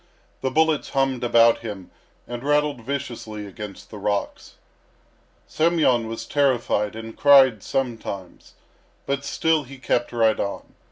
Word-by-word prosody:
The 130 - 0
bullets 160 +2 +1
hummed 135 -2 0
about 115 -1 +5
him 105 -5 -8 0.4
and 120 +1 -6
rattled 145 -2 +1
viciously 115 -5 -5
against 100 0 -9
the 105 - -8
rocks. 100 0 -3 0.9
Semyon 155 -8 +2
was 115 0 -6
terrified 120 -7 +1
and 115 0 -8
cried 135 -6 +6
sometimes, 110 -8 -5 0.5
but 140 0 -2
still 160 +2 +1
he 140 0 -11
kept 120 -1 -1
right 115 -2 +2
on. 100 - -4
120 Hz, 125 wpm, -23 LUFS, 110-140 Hz, 0.9 s, cried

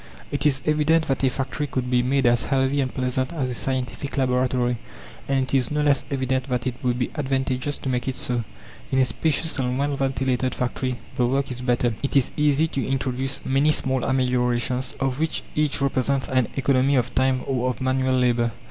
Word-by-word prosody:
It 145 +1 +1
is 135 -2 0
evident 155 +1 +3
that 135 0 0
a 130 - +5
factory 135 +3 -3
could 130 -2 -3
be 125 -1 +4
made 135 +2 +1
as 120 0 +3
healthy 135 0 +1
and 130 -1 -1
pleasant 130 0 -1
as 135 -6 -1
a - - -2
scientific 130 +2 -3
laboratory. 125 -2 +1 0.5
And 135 -1 +2
it 130 - -6
is 130 -2 +2
no 150 0 0
less 145 -2 +3
evident 130 -1 -1
that 125 -1 -1
it 130 - 0
would 125 -2 0
be 125 - -1
advantageous 135 -1 -1
to - - -7
make 125 -1 -1
it 130 - -1
so. 120 -2 -1 0.5
In 135 - +1
a 130 - +5
spacious 160 +3 -1
and 125 -1 0
well 140 +1 0
ventilated 130 -1 0
factory 125 0 -2 0.2
the 125 - +3
work 135 +1 0
is 125 0 -5
better; 120 -1 +1
it 140 - -2
is 135 -3 +3
easy 150 +1 +3
to 135 -5 -2
introduce 130 0 -2
many 135 +3 +3
small 130 -3 0
ameliorations, 125 0 0
of 135 0 -1
which 160 0 -1
each 150 -1 +1
represents 135 0 +1
an 130 -3 +2
economy 135 0 +2
of 125 - 0
time 130 -1 +2
or 130 -2 0
of 125 - -4
manual 130 0 +1
labour. 120 -2 +2
130 Hz, 200 wpm, -24 LUFS, 125-140 Hz, 0.5 s, a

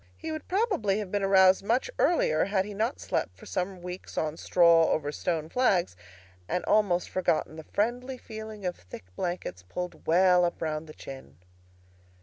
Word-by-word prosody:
He 320 0 -5
would 310 -1 -6
probably 370 - +1
have 205 -3 -4
been 205 - 0
aroused 190 -1 +5
much 235 - +1
earlier, 160 - +3
had 195 -1 0
he 210 - -7
not 220 +6 -1
slept - - -2
for - - -14
some 180 -1 -3
weeks 180 +1 -8
on 155 0 -1
straw 170 -1 +5
over 145 -1 0
stone 160 0 -2
flags, 185 - +1 0.5
and 180 - -1
almost 190 -5 +2
forgotten 160 -4 0
the 160 -1 -9
friendly 245 +5 -1
feeling 220 -3 -8
of 180 - -1
thick 90 0 -12
blankets 175 - -4
pulled 180 - -7
well 180 +1 +5
up 175 - -1
round 155 -1 -3
the 155 - -11
chin. 130 - -10
185 Hz, 170 wpm, -28 LUFS, 165-215 Hz, 0.5 s, aroused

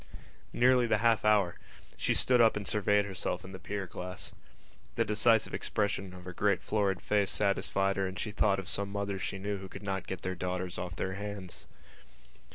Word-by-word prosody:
Nearly 125 0 +4
the 110 - +3
half 115 0 +3
hour! 105 -5 +3 0.4
She - - 0
stood 125 -1 +5
up 115 -1 +5
and 100 -2 -5
surveyed 105 -1 +2
herself 95 -2 -3
in 95 - -9
the 95 - -8
pier 100 -1 -4
glass. 90 0 -6 0.6
The - - +2
decisive 110 +1 +3
expression 100 -2 -1
of 90 -1 -11
her 90 - -6
great 100 0 +1
florid 100 -3 +1
face 100 -2 +1
satisfied 100 -1 +1
her 95 -1 +1
and 95 - -6
she 105 - -3
thought 100 -1 +2
of 95 -2 -5
some 100 0 -1
mothers 100 -1 -2
she - - -2
knew 100 +1 -3
who 95 0 -9
could - - -9
not 95 -1 -3
get 95 -2 -5
their 95 - -1
daughters 90 0 -3
off 90 -1 -5
their 95 - -2
hands. 100 -2 -5
100 Hz, 195 wpm, -31 LUFS, 95-105 Hz, 0.6 s, stood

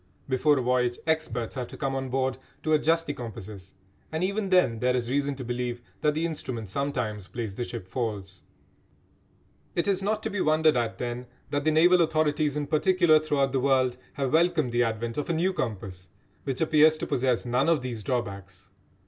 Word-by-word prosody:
Before 140 +3 +3
a 130 - 0
voyage 125 -1 +1
experts 155 -8 -1
have 125 -3 -4
to - - -11
come 135 -1 -1
on 135 -1 -3
board 130 0 -1 0.2
to 155 - +1
adjust 165 +2 +3
the 145 - -3
compasses, 105 -7 -9 0.4
and 160 +2 -1
even 200 +1 -1
then 180 -12 +3
there 125 +1 +2
is 120 -1 -2
reason 140 0 0
to 130 - -6
believe 120 0 -3 0.2
that 150 -1 +2
the 160 +2 0
instrument 125 - -4
sometimes 115 -6 -2
plays 115 -3 -5
the 120 - -3
ship 115 -6 -7
false. 100 -4 -4 1.3
It 170 - 0
is 195 -1 +1
not 210 +2 -1
to 220 - -2
be 200 - -1
wondered 155 -1 +4
at, 115 -2 -1
then, 125 0 -4 0.2
that 145 0 -1
the 155 - +4
naval 175 +3 +5
authorities 155 -2 +1
in 145 - -1
particular 165 +1 +4
throughout 145 -3 0
the 135 - +1
world 130 -2 +2 0.2
have 135 -1 -2
welcomed 160 -5 +3
the 120 +1 +2
advent 115 +2 -1
of 150 - -4
a - - +2
new 180 +4 +1
compass 95 - -5 0.4
which 135 +1 -2
appears 155 0 +5
to - - -3
possess 125 -2 0
none 125 +5 +2
of 165 -5 +3
these 120 -4 -4
drawbacks. 100 -5 -4
135 Hz, 195 wpm, -27 LUFS, 120-155 Hz, 1.3 s, naval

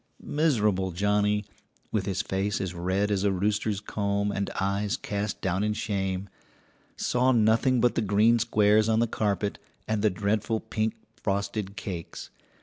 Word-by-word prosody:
Miserable 105 - +1
Johnnie, 105 +3 +1 0.5
with 105 -3 -1
his 95 -1 -1
face 95 0 -1
as 95 -2 -3
red 95 +4 0
as 100 -1 +1
a 100 - +3
rooster's 105 +2 0
comb 100 -1 -1
and 100 -1 -2
eyes 100 +4 0
cast 105 -5 -3
down 95 +1 0
in 105 0 +1
shame, 95 -2 -2 0.7
saw 125 +1 +2
nothing 115 +2 +3
but 120 +1 +3
the - - 0
green 110 +3 +4
squares 110 -1 +3
on 110 - +3
the 115 - +4
carpet 105 -2 -1 0.3
and 110 -1 0
the 110 - +4
dreadful 105 +3 0
pink 110 0 -2 0.2
frosted 100 0 -2
cakes. 90 -6 -6
105 Hz, 150 wpm, -27 LUFS, 100-110 Hz, 0.7 s, green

